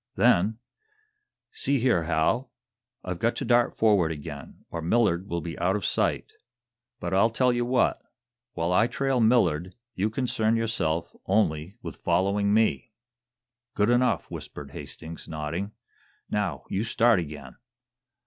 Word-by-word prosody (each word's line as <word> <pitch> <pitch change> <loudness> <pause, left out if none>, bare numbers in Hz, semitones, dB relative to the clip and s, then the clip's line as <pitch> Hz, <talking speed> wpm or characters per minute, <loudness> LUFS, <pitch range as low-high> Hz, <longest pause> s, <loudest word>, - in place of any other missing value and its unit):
Then: 105 +5 +3 0.9
"See 140 0 0
here, 120 -10 +2
Hal, 100 +11 +1 0.5
I've 90 -2 -4
got 115 +5 +1
to 135 - -3
dart 120 0 +3
forward 100 -7 +3
again, 75 -2 -8
or 85 - -4
Millard 95 0 +1
will 85 -2 -2
be 85 +1 -5
out 90 +3 +2
of 105 - -2
sight. - - 0 0.7
But 85 +1 -3
I'll 100 +4 +4
tell 125 +2 +2
you 120 0 0
what 125 0 +1 0.5
while 85 +2 -1
I 110 +5 +4
trail 135 +1 0
Millard, 95 -8 +2 0.2
you 100 +4 0
concern 115 -2 0
yourself 110 -8 -1
only 95 -3 +1
with - - -7
following 100 +2 +1
me." 110 +1 +1 0.8
"Good 105 +3 +3
enough," 125 +1 +2
whispered - - -8
Hastings, 80 +1 -9
nodding. 80 +6 -4 0.6
"Now, 105 -3 -1
you 100 - -1
start 115 -1 +3
again!" 75 -5 -7
100 Hz, 140 wpm, -26 LUFS, 85-115 Hz, 0.9 s, I'll